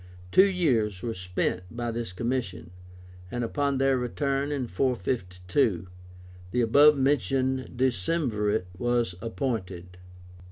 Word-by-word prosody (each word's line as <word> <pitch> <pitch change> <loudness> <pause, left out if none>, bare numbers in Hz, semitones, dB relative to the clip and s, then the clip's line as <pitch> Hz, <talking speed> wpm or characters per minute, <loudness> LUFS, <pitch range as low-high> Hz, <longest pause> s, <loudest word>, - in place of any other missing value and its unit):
Two 190 +2 +7
years 115 - +1
were 115 - -2
spent 90 -1 -2
by 120 +2 -3
this 115 -3 -4
commission, 90 -6 -3 0.6
and 120 +4 -3
upon 140 +3 0
their 135 -1 +2
return 140 +3 -1
in 140 -3 -1
452 90 - -1 0.6
the 125 +5 0
above 145 +6 +6
mentioned 130 -1 0
Decemvirate 110 - 0
was 120 -4 +1
appointed. 95 -7 -4
120 Hz, 110 wpm, -27 LUFS, 95-135 Hz, 0.6 s, Two